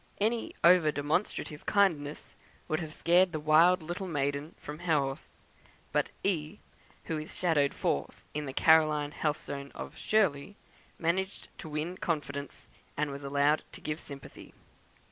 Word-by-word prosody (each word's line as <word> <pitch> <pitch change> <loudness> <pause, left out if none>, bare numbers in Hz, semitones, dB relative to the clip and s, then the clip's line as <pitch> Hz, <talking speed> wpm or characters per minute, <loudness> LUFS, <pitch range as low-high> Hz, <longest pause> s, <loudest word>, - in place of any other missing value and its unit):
Any 225 +3 0
over 170 -3 +6
demonstrative 150 +1 -2
kindness 160 -8 +1 0.3
would 155 - 0
have 160 -3 -5
scared 175 +3 +3
the 155 - -1
wild 160 +4 +5
little 175 +4 -4
maiden 145 0 -2
from 150 +1 -8
Haworth; 150 -6 0 0.6
but - - +1
"E." 75 - -1 0.5
(who 160 -1 -3
is 155 - -8
shadowed 150 -6 +2
forth 70 - -2
in 150 -1 -3
the - - -3
Caroline 155 -1 +4
Helstone 140 -2 -3
of - - -7
"Shirley") 195 -5 +1 0.4
managed 190 +4 -1
to 160 - -7
win 155 +4 -3
confidence, 145 -4 -4 0.3
and 145 0 0
was 140 +1 -7
allowed 140 +2 +2
to - - -10
give 155 +1 -4
sympathy. 140 -2 -11
155 Hz, 140 wpm, -30 LUFS, 145-175 Hz, 0.6 s, over